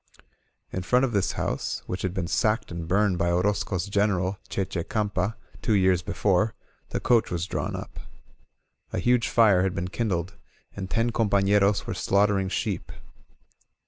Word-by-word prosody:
In 95 - -3
front 125 +8 +3
of 125 - -2
this 100 -4 +1
house, - - -3
which 90 - -4
had 95 - -1
been 95 -2 -2
sacked 105 +5 0
and 85 -1 -5
burned 95 0 +2
by 85 - +2
Orozco's 90 0 0
General, 100 -2 0
Che 95 - -1
Che 90 -2 -4
Campa, 105 0 -1 0.3
two 110 - +2
years 95 -2 +3
before, 100 +3 +1 0.3
the - - -2
coach 120 -2 +3
was 85 -1 -2
drawn - - -3
up. - - -8 0.9
A - - -3
huge 120 -1 +2
fire 105 -6 +5
had 95 -1 0
been 90 +2 -3
kindled, 95 -4 -2 0.4
and 95 -2 -5
ten 115 +2 +1
compafleros 100 -2 +2
were - - -3
slaughtering 100 -1 +2
sheep. - - -3
100 Hz, 160 wpm, -26 LUFS, 90-105 Hz, 0.9 s, fire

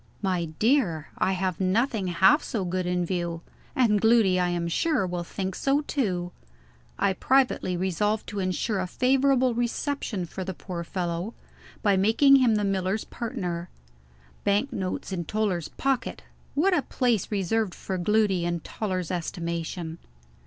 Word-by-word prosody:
"My 180 -3 +1
dear, 170 - +1
I 190 - +2
have 185 -2 -1
nothing 205 +2 +1
half 190 - +5
so 215 -7 -3
good 180 0 -1
in 180 0 0
view; 170 -2 -2 0.3
and 215 -6 +3
Gloody, 220 -5 +4
I 180 0 +2
am 175 -1 -1
sure, 240 - +1
will 175 -1 -3
think 190 +2 -4
so 275 +8 +1
too." 185 -12 -1 0.7
I 195 - +2
privately 250 -6 +2
resolved 205 +4 0
to 205 - -4
insure 190 +3 -1
a 185 - -1
favorable 260 +3 +3
reception 240 - -2
for 190 +3 -6
the 190 0 -5
poor 175 -1 -5
fellow, 175 +4 -3 0.5
by 200 -3 +4
making 230 +8 +6
him 245 -4 +4
the 210 - +1
miller's 195 +1 0
partner. 180 -8 -4 0.7
Bank 205 +7 +1
notes 190 -1 -3
in 175 -2 -2
Toller's 200 -4 -1
pocket! 270 -2 -2 0.3
What 360 +6 +3
a 315 - +2
place 240 -7 0
reserved 205 0 0
for 190 -1 -4
Gloody 200 -1 +2
in 170 -1 -1
Toller's 185 -4 -3
estimation! 170 -1 -4
190 Hz, 150 wpm, -26 LUFS, 175-230 Hz, 0.7 s, making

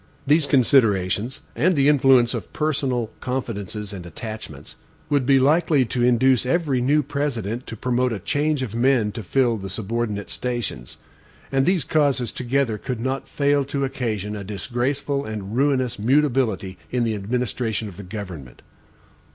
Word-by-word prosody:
These 150 +1 +4
considerations, 115 -4 +2
and 170 +9 +2
the 140 -1 +3
influence 135 -4 +5
of - - -5
personal 135 -7 -1
confidences 105 -5 -4
and 95 -3 -7
attachments, 110 +6 -8 0.4
would 140 -3 +2
be 135 -1 +6
likely 150 0 +3
to 120 +2 -2
induce 125 +1 +4
every 135 -1 +1
new 145 +4 +3
President 125 -5 -3
to 115 - -7
promote 125 +2 0
a 110 - -2
change 145 +7 0
of 115 -5 -5
men 120 -3 +2
to 115 - -6
fill 120 +3 +1
the 95 -1 -6
subordinate 105 0 -3
stations; 120 - -4 0.5
and 135 0 +2
these 180 -4 +3
causes 140 -5 +1
together 125 -3 -1
could 125 -4 -4
not 130 +2 -3
fail 145 0 +2
to 140 0 -2
occasion 110 -6 -3
a 100 - -5
disgraceful 130 +8 -2
and 105 -2 -5
ruinous 130 -4 +1
mutability 120 -7 +1
in 125 -1 0
the 115 -1 0
administration 110 +1 -2
of 95 -4 -10
the - - -7
government. 90 - -8
125 Hz, 150 wpm, -23 LUFS, 110-135 Hz, 0.5 s, be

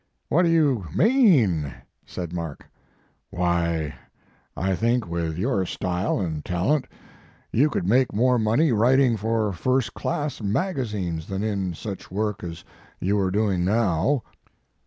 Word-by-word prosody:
"V/hat 175 +4 +4
do - - +3
you 145 - +2
mean?" 150 - +4 0.4
said 85 -2 -6
Mark. 85 -4 -5 0.6
"Why, 85 -3 0 0.6
I 95 +1 0
think 115 +1 +1
with 85 -2 -3
your 100 0 0
style 90 +4 -1
and 80 -6 -3
talent 105 - 0 0.7
you 140 +7 +4
could 90 - -2
make 125 +4 +3
more 125 +3 +2
money 115 +8 +2
writing 125 +2 +4
for 110 -1 0
first 125 +4 0
class 145 -4 -3
magazines 105 - -2
than 95 +1 -3
in 100 -5 -2
such 100 +2 -7
work 105 0 -2
as 85 0 -7 0.4
you 100 +3 +1
are 95 -1 +1
doing 100 -2 +1
now." 110 - +1
105 Hz, 135 wpm, -24 LUFS, 90-125 Hz, 0.7 s, V/hat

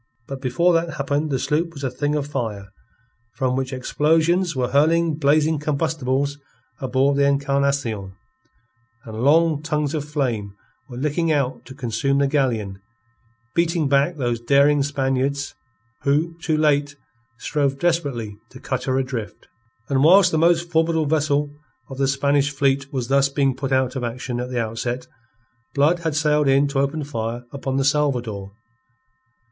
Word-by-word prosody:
But 135 -1 -6
before 170 +7 +2
that 165 -1 0
happened 145 +2 -1
the 135 - 0
sloop 165 +5 -1
was 140 -2 -9
a 130 - -1
thing 145 +4 -1
of 145 -2 -1
fire, 110 -8 -4 0.7
from 130 -1 0
which 130 0 -2
explosions 160 +6 +1
were 125 -2 0
hurling 160 +4 +3
blazing 155 +1 +2
combustibles 145 -2 -1 0.4
aboard 135 +1 +1
the 140 0 +4
Encarnacion, 140 -8 0 0.9
and 110 0 -6
long 155 +1 +4
tongues 150 -2 -1
of 155 -3 -2
flame 125 -9 -2 0.3
were 120 - -8
licking 150 +4 0
out 140 -4 -1
to 130 - -11
consume 135 +1 -1
the 140 - +3
galleon, 115 -9 -1 0.7
beating 170 -2 +1
back 140 +5 +2
those 120 -3 -1
daring 140 +3 +4
Spaniards 140 0 -1 0.5
who, 155 +4 +1
too 160 -2 0
late, 145 -2 +2 0.4
strove 140 0 -1
desperately 135 -11 -1
to 130 - -13
cut 130 -1 -3
her 130 -1 0
adrift. 130 -5 -4 0.4
And 135 -1 +1
whilst 180 +3 +6
the 160 - +1
most 170 +1 +2
formidable 160 -1 +2
vessel 145 -1 +1 0.4
of 135 - -7
the 135 - +2
Spanish 140 +1 +2
fleet 140 -1 0
was 130 -3 -3
thus 140 +1 +3
being 135 -2 +1
put 135 0 -4
out 130 0 +1
of 130 - -3
action 120 +1 -4
at 125 +1 -4
the 125 -1 -2
outset, 115 +2 -3 0.7
Blood 150 +5 +3
had 160 -3 -2
sailed 150 -1 +2
in 135 +1 +4
to 140 -1 -1
open 140 +3 -1
fire 120 -3 -4
upon 135 -1 -3
the 135 - +1
Salvador. 125 -9 0
140 Hz, 155 wpm, -22 LUFS, 130-150 Hz, 0.9 s, whilst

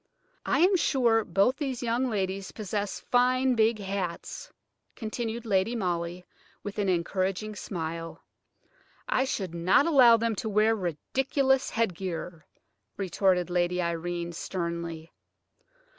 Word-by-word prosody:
"I - - +2
am 375 +3 +5
sure 235 -8 +3
both 205 +6 +2
these 265 -5 -3
young 240 +2 0
ladies 195 -2 -2
possess 205 -1 -3
fine 255 +1 +3
big 225 -1 +3
hats," 195 - -5 0.4
continued 230 +1 -4
Lady 205 +2 +1
Molly 175 -3 -2 0.4
with 205 +1 -5
an 200 -2 +1
encouraging 185 +4 -1
smile. 165 -4 -5 0.8
"I 260 - +2
should 190 -9 -3
not 175 +11 +3
allow 255 -8 +7
them 230 0 0
to 220 - -3
wear 215 +2 +3
ridiculous 265 - 0
headgear," 180 -6 -3 0.5
retorted 185 -1 +1
Lady 175 0 +1
Irene, 170 0 -2
sternly. 170 -2 -4
200 Hz, 115 wpm, -28 LUFS, 175-235 Hz, 0.8 s, allow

